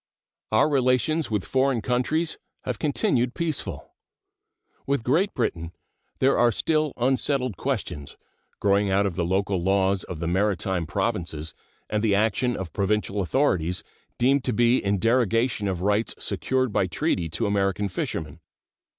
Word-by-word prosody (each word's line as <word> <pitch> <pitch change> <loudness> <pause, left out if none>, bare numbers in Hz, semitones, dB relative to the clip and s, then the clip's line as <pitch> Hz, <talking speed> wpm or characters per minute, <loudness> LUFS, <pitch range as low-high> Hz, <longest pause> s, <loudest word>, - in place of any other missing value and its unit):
Our 110 +6 +4
relations 135 +2 +1
with 105 -4 -1
foreign 135 -2 +1
countries 155 +7 0 0.2
have - - -3
continued 130 -4 +1
peaceful. 165 -4 -3 0.9
With 140 -4 0
Great 170 - +2
Britain 85 -8 -2 0.4
there 135 +1 +3
are 120 0 +5
still 155 +5 0
unsettled 130 -1 +1
questions, 75 -3 -4 0.4
growing 100 0 +2
out 100 +1 +2
of 95 -4 -2
the 85 - 0
local 95 +1 0
laws 95 +1 +2
of 90 - -6
the 85 - -4
maritime 95 -1 0
provinces 85 -6 -2 0.3
and 105 0 -1
the 105 -3 +3
action 110 +4 +1
of 90 -4 -6
provincial 105 0 0
authorities 90 - +1 0.3
deemed 135 +2 +3
to 125 - 0
be 120 +3 +3
in 100 0 +1
derogation 115 0 +1
of 90 -3 -2
rights 105 +3 +1
secured 130 -4 -1
by 95 - +2
treaty 90 - -1
to 85 - -2
American 100 0 0
fishermen. 80 -5 -4
105 Hz, 140 wpm, -25 LUFS, 95-130 Hz, 0.9 s, are